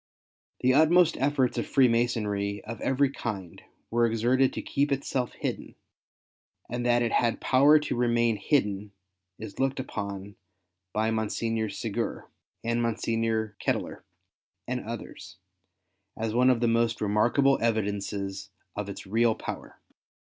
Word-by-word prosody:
The 130 +1 +4
utmost 165 +3 +5
efforts 135 -2 +1
of - - -3
Freemasonry 115 -5 +1
of 115 +1 -7
every 135 +1 +2
kind 100 -10 -6 0.3
were 120 0 +3
exerted 120 +4 +2
to - - -4
keep 140 +1 0
itself 135 -2 -1
hidden, - - -5 0.9
and 120 +1 -3
that 120 0 +3
it 115 - 0
had 120 -2 +1
power 140 +4 +5
to - - -2
remain 120 -2 +2
hidden 105 -6 0 0.4
is 110 -2 -9
looked 135 0 0
upon 100 -5 -5 0.5
by 110 +2 0
Monsignor 110 0 -1
Segur, - - -3 0.4
and 115 +1 0
Mon 115 -1 0
signor 115 -2 -1
Ketteler, - - -2 0.7
and - - -2
others, - - -8 0.8
as 110 -1 -2
one 125 +2 +4
of 125 -2 +2
the 120 - +3
most 115 0 +1
remarkable 120 +7 +3
evidences 100 -3 -2 0.3
of 105 -1 -4
its 100 - -7
real 110 +3 +2
power. - - -7
115 Hz, 130 wpm, -27 LUFS, 105-130 Hz, 0.9 s, utmost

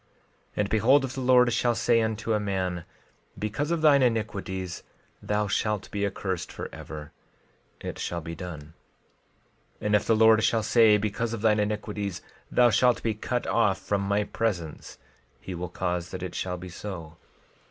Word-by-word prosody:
12:20 - - -38 0.5
And 105 -1 +1
behold, 130 +6 +4
if 130 - -6
the 135 - -4
Lord 125 -1 +5
shall 120 +1 +2
say 115 0 +3
unto 110 0 -1
a 105 - +2
man—Because 100 - -4
of 170 -2 0
thine 145 -3 +6
iniquities, 100 -6 -1 0.4
thou 105 0 0
shalt 105 +2 -1
be 100 0 0
accursed 95 -2 -4
forever—it 75 0 -10
shall 85 - -2
be 85 0 -7
done. 85 -2 -7
12:21 75 +2 -15 1.1
And 105 0 +3
if 105 - +2
the 115 - +4
Lord 110 0 +6
shall 115 -2 +2
say—Because 110 0 +3
of 115 - -4
thine 110 -1 +4
iniquities 105 -2 -3 0.3
thou 120 -1 +5
shalt 125 +1 +3
be 115 - +1
cut 120 +3 -2
off 105 -5 +2
from 100 -1 -1
my 100 +1 +1
presence—he 90 - -5
will 90 0 -4
cause 90 -1 -2
that 90 - -6
it 90 - -5
shall 90 -1 -3
be 90 +1 -8
so. 85 -4 -7
105 Hz, 160 wpm, -27 LUFS, 90-115 Hz, 1.1 s, thine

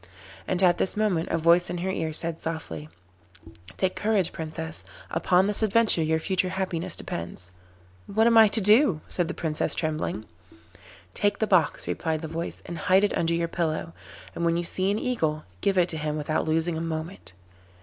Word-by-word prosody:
And 185 +1 0
at 175 -1 +4
this 190 - 0
moment 195 -6 0
a - - +1
voice 170 +2 +4
in 175 - -3
her 185 +2 -2
ear 160 -4 -2
said 165 +1 -3
softly: 80 - -6 0.9
'Take 185 -1 0
courage, 210 -4 +1
Princess; 160 0 -6 0.3
upon 185 +1 +3
this 205 +1 +2
adventure 220 -4 +4
your 160 0 +1
future 185 +2 0
happiness 185 -2 -2
depends.' 85 +1 -6 0.6
'What 220 +3 +2
am 235 0 +4
I 220 -1 +8
to 220 +2 +3
do?' 210 - +4
said 175 -2 -1
the 175 - -5
Princess 155 -2 0
trembling. 155 -8 -2 0.9
'Take 205 0 +1
the 220 - +1
box,' 180 -7 +2
replied 160 -1 -2
the 160 - -5
voice, 165 +2 -5
'and 170 - -6
hide 190 +2 +3
it 205 - +1
under 170 0 +1
your 170 0 0
pillow, 165 -1 -2 0.4
and 170 - -4
when 170 0 +2
you 175 - -1
see 185 +2 0
an 205 - +1
Eagle, 160 -12 -1 0.2
give 195 -1 +1
it 175 -1 +3
to 160 - -3
him 150 0 -2
without 155 +1 -1
losing 160 +1 0
a - - -3
moment. 160 - -5
170 Hz, 190 wpm, -26 LUFS, 160-190 Hz, 0.9 s, I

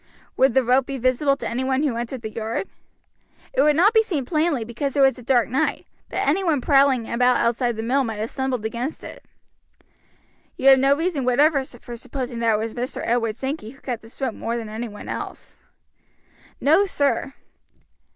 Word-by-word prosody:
"Would 260 -2 +3
the 265 - +4
rope 250 +2 +2
be 275 - -4
visible 260 +3 +1
to - - -5
any 250 +3 -2
one 265 +2 0
who 275 -6 0
entered 240 +1 -5
the 220 - -5
yard?" 225 - -3 0.9
"It - - +3
would 300 0 +4
not 385 +8 +4
be 445 - +6
seen 320 - -2
plainly, 305 -4 0
because 270 +5 -3
it - - +4
was 270 -1 +4
a - - -10
dark 245 -1 +2
night; 255 +4 -1 0.2
but - - -2
any 345 +7 +2
one 320 -6 +2
prowling 270 -3 +3
about 250 +1 +2
outside 240 0 0
the 220 - -4
mill 265 +4 +1
might 225 -3 -3
have 215 +2 -4
stumbled 260 -4 -2
against 240 +7 -4
it." - - -10 1.3
"You 270 - +5
have 265 -1 +7
no 275 +1 +4
reason 325 -4 -1
whatever 275 +3 +3
for 240 -2 -10
supposing 245 0 -5
that 230 -2 +2
it - - +1
was 220 +1 -3
Mr. 250 +1 -4
Edward 230 -2 0
Sankey 265 -2 -4
who 270 +3 -15
cut 245 -5 -5
this 225 +1 -15
rope 260 -4 -1
more 230 +2 -3
than 225 -2 -6
anyone 215 -1 -7
else?" - - -7 1.0
"No, 320 +8 +4
sir." 280 -5 0
260 Hz, 200 wpm, -23 LUFS, 235-280 Hz, 1.3 s, have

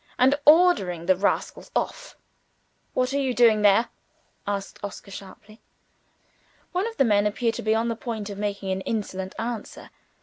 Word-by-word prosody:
and 255 +2 +5
ordering 295 - +5
the 185 +1 +4
rascals 195 +3 -1
off. - - -3 0.8
"What 255 +1 +1
are 280 - +1
you 260 -3 -1
doing 225 -3 +5
there?" 210 +3 +4 0.6
asked 200 -1 -4
Oscar 200 0 -7
sharply. 200 +3 -12 1.1
One 370 +4 0
of 455 - -8
the 270 - +4
men 205 -2 +3
appeared 230 +2 0
to - - -5
be 220 +1 +1
on 225 +1 +1
the 230 - -1
point 225 -3 -5
of 200 - -8
making 200 -2 -3
an 190 0 -2
insolent 190 -3 -4
answer. 230 -2 -6
215 Hz, 165 wpm, -25 LUFS, 200-245 Hz, 1.1 s, and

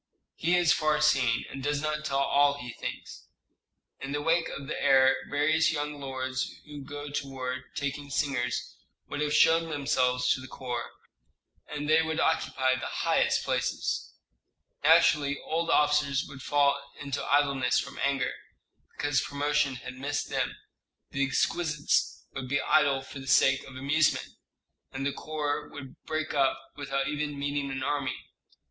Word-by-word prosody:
"He 170 +2 +1
is 175 -2 +4
far 155 -1 +1
seeing, 130 -6 +3
and 135 - -6
does 145 +1 0
not 155 0 -2
tell 135 - 0
all 140 +1 +3
he 125 -3 -7
thinks. - - -7 0.7
In 135 +1 -5
the 145 - -1
wake 165 +1 +2
of 140 - -6
the 140 - -4
heir 135 0 +6
various 155 +3 +3
young 150 -1 -3
lords 130 -1 -3
who 145 -2 -9
go 145 +1 -7
to 140 -1 -3
war 130 -1 -4
taking 140 0 -3
singers 135 -4 -1 0.3
would 145 - -4
have 150 0 0
shoved 165 +2 +4
themselves 130 -3 +1
into 130 - +2
the 130 - -9
corps, 125 -2 -5 0.8
and 150 0 -5
they 155 +1 +5
would 160 0 -2
occupy 130 -5 +2
the 130 - -3
highest - - +1
places. - - -2 0.7
Naturally 145 -1 +5
old 165 +1 -1
officers 150 -2 +3
would 140 - -10
fall 140 0 +2 0.2
into 140 -2 -3
idleness 140 -3 +2
from - - -3
anger, 135 -2 +1 0.6
because 145 -1 +1
promotion 145 -1 0
had 125 - -8
missed 140 +3 -3
them; - - -1 0.6
the 140 - 0
exquisites 150 +3 0
would 130 -1 -5
be 140 +1 +2
idle 140 -3 +3
for 140 - -9
the 135 - -10
sake 135 0 +4
of 135 - -12
amusement, 145 +4 +1 0.6
and 135 +1 -4
the 140 - 0
corps 150 -2 -3
would 135 -2 -10
break 155 0 -2
up 135 -2 +2 0.2
without 140 -1 -2
even 150 0 -3
meeting 140 0 -2
an 135 0 -3
enemy. 135 -2 -1
140 Hz, 155 wpm, -28 LUFS, 135-150 Hz, 0.8 s, heir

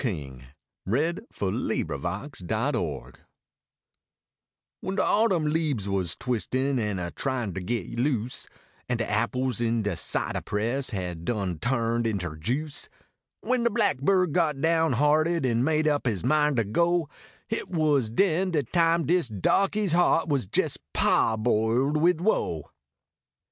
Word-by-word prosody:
DE 80 - -3 0.6
BLACKBIRD 160 - 0
FETCHED - - -3
DE - - 0
SPUING - - -3 1.7
When 190 - -4
de - - +2
autumn 200 -7 +2
leabes 150 -9 0
was 95 -5 -1
I - - -12
\vislin 130 +2 0
An 105 -3 -1
a 85 -1 -4
tryin 125 -8 -2
ter 95 - -4
git 115 +2 -3
loose 125 -3 -1 0.4
An 120 - +1
de 115 - -2
apples 120 +3 0
in 115 -1 +1
de 105 - 0
cidah - - -3
press 120 +6 -1
Had 90 -5 -4
done 95 -5 -2
turned 115 0 0
inter 90 -8 -3
juice; 135 - -3 0.5
When 250 -1 0
de 235 - +3
blackbird 185 - +2
got 155 -5 +1
down 160 -1 +2
hearted 155 +4 +2
An 120 -1 +1
made 155 +1 +2
up 145 -3 +1
his 100 -7 -1
mind 150 -2 +2
ter 115 - +3
go, 170 - +1 0.4
Hit 225 - -3
was 150 -8 +2
den 185 - +2
de 155 -5 0
time 165 +4 +2
dis 170 -4 +2
dahkey 195 - +1
s 195 - +1
heart 170 -1 +3
Was 140 - 0
jes - - +1 0.2
pahboiled 115 +5 +2
wid 170 +1 +3
woe. 85 - 0
130 Hz, 145 wpm, -26 LUFS, 110-165 Hz, 1.7 s, de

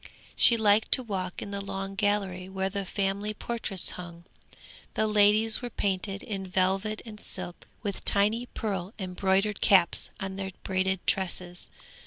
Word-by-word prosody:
She 235 - +7
liked 215 0 +4
to 255 - +5
walk 185 -5 -4
in 200 - -7
the 200 0 -3
long 195 0 -5
gallery 195 -2 0
where 190 0 -2
the 200 0 -3
family 200 +2 -2
portraits 220 -5 0
hung. 170 -1 -9 0.7
The 220 - +2
ladies 215 +1 +4
were 245 - -4
painted 195 -1 -2
in 195 -3 -4
velvet 190 +3 0
and 215 -2 -9
silk, 180 -3 -4 0.2
with 200 -3 -4
tiny 215 +4 +2
pearl 195 -4 -4
embroidered 190 +1 0
caps 190 -4 +4
on 195 0 -4
their 195 -1 -3
braided 190 -1 0
tresses. 180 -2 -1
195 Hz, 150 wpm, -28 LUFS, 190-210 Hz, 0.7 s, She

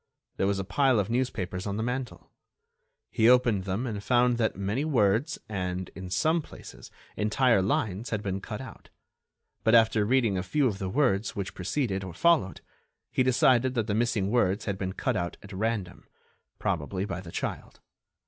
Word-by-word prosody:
There 95 - +1
was 100 0 +1
a 95 - -2
pile 125 +5 +2
of 100 +2 -1
newspapers 105 -7 -2
on 100 0 -2
the 110 - -1
mantel. 125 +1 -4 0.8
He 115 0 +4
opened 120 -6 +4
them 100 +6 -2
and 105 -4 -4
found 125 0 +3
that 110 -2 +1
many 100 +8 -2
words 125 0 +1
and, 90 -3 -3
in 95 -1 -9
some 160 - +2
places, - - -12 0.3
entire 110 +1 +3
lines 110 -1 -1
had 110 -2 -2
been 95 -1 -3
cut 105 +2 -6
out. 130 - -11 0.7
But, 110 +1 +5
after 110 -2 +4
reading 115 -4 +2
a - - -1
few 135 +10 0
of 105 -6 0
the 95 - -3
word's 115 -4 +1
which 100 -1 -4
preceded 95 0 -2
or 90 -3 -8
followed, 165 - +2 0.5
he - - +1
decided 130 0 +3
that 115 -3 +1
the 105 - -2
missing 110 -3 0
words 100 -5 +1
had 100 -2 -3
been 95 -1 -3
cut - - -1
out 85 0 -3
at 100 0 -11
random—probably 95 -3 -4
by 95 -2 -5
the 85 -3 -10
child. - - -5
105 Hz, 175 wpm, -28 LUFS, 95-125 Hz, 0.8 s, But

